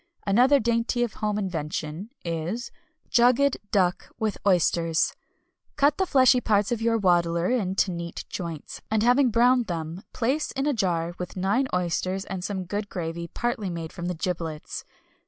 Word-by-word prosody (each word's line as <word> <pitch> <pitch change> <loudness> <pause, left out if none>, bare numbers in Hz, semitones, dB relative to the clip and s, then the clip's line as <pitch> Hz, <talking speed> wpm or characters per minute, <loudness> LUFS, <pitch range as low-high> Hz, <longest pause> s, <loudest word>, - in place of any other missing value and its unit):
Another 250 +8 +5
dainty 235 +1 +1
of 235 - -2
home 210 -1 -1
invention 165 -1 -3 0.2
is 170 +9 -3 0.4
Jugged 250 +3 +4
Duck 185 -3 +1
with 220 -3 -2
Oysters. 170 -3 +2 0.6
Cut 285 0 +3
the 380 - +2
fleshy 255 -4 +5
parts 205 -2 +2
of 235 -2 -1
your 230 0 +2
waddler 175 -2 +2
into 195 -5 +1
neat 170 -1 -5
joints, 165 -4 -6
and 215 0 +2
having 250 +2 +4
browned 245 +1 +4
them 165 +1 -4
place 265 +6 0
in 270 0 -1
a 295 - +2
jar 175 -6 0
with 180 +1 -6
nine 200 +9 +1
oysters 180 +2 -1
and 190 -2 -5
some 190 -1 -3
good 205 +3 -4
gravy 170 -1 -4
partly 240 +1 -2
made 165 -2 -5
from 175 -1 -5
the 180 - -2
giblets. 165 -3 -4
195 Hz, 155 wpm, -26 LUFS, 170-240 Hz, 0.6 s, Another